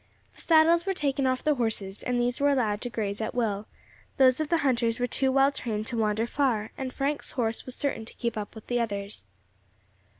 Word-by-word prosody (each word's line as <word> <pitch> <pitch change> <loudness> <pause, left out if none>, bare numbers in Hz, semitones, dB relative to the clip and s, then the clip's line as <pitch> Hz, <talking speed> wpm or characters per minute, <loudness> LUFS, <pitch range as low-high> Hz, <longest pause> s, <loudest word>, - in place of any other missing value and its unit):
The - - -16
saddles 335 +2 +4
were 385 - +1
taken 275 -4 0
off 255 0 0
the 300 - +3
horses, 220 -6 -3
and 250 -1 -1
these 240 +1 0
were 285 +1 +4
allowed 225 -6 +1
to 245 - -3
graze 210 -3 -3
at 220 - -3
will; 215 -4 -1 0.5
those 260 -1 +5
of 310 -1 -1
the 335 - +3
hunters 235 -3 +1
were 245 - +2
too 265 +1 +1
well 270 +1 +4
trained 215 -6 -3
to 240 - -4
wander 215 +1 +1
far, 235 -5 0
and 260 -1 -4
Frank's 285 +3 -2
horse 225 -1 -1
was 255 - -2
certain 275 -6 -2
to - - -12
keep 235 -1 -2 0.2
with 220 - -10
the 245 0 0
others. 200 - -4
245 Hz, 210 wpm, -27 LUFS, 220-275 Hz, 0.5 s, those